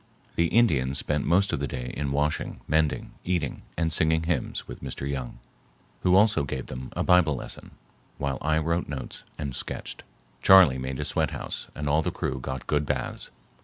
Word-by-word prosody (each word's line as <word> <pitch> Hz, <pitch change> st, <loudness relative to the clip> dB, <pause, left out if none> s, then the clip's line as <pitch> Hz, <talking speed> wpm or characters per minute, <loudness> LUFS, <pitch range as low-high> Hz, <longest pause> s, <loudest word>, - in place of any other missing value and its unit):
The 85 Hz, -, +3 dB
Indians 70 Hz, -, +3 dB
spent 75 Hz, -1 st, -1 dB
most 95 Hz, +5 st, +3 dB
of -, -, 0 dB
the 70 Hz, -, -1 dB
day 60 Hz, 0 st, -5 dB
in 70 Hz, -2 st, -2 dB
washing, 75 Hz, +2 st, -1 dB
mending, 80 Hz, -1 st, +1 dB
eating, 85 Hz, -6 st, -1 dB, 0.2 s
and 80 Hz, -1 st, +1 dB
singing 80 Hz, +1 st, +3 dB
hymns 80 Hz, -6 st, -2 dB
with 60 Hz, -, -8 dB
Mr. 70 Hz, +1 st, -5 dB
Young, 65 Hz, -3 st, -4 dB, 0.6 s
who 90 Hz, 0 st, +4 dB
also 105 Hz, -5 st, +5 dB
gave 65 Hz, -2 st, -4 dB
them 65 Hz, 0 st, -7 dB
a -, -, -1 dB
Bible 90 Hz, -5 st, +4 dB
lesson, -, -, -8 dB, 0.5 s
while 70 Hz, -1 st, -2 dB
I 80 Hz, +1 st, +2 dB
wrote 85 Hz, +2 st, 0 dB
notes 70 Hz, -3 st, -6 dB
and 70 Hz, -4 st, -4 dB
sketched. -, -, -5 dB, 0.4 s
Charley 90 Hz, -9 st, +7 dB
made 65 Hz, +1 st, -4 dB
a -, -, -2 dB
sweathouse -, -, -2 dB
and 75 Hz, 0 st, -3 dB
all 75 Hz, +2 st, +3 dB
the -, -, -1 dB
crew -, -, -3 dB
got 65 Hz, 0 st, -5 dB
good 75 Hz, 0 st, +1 dB
baths. -, -, -3 dB
75 Hz, 180 wpm, -27 LUFS, 65-85 Hz, 0.6 s, Charley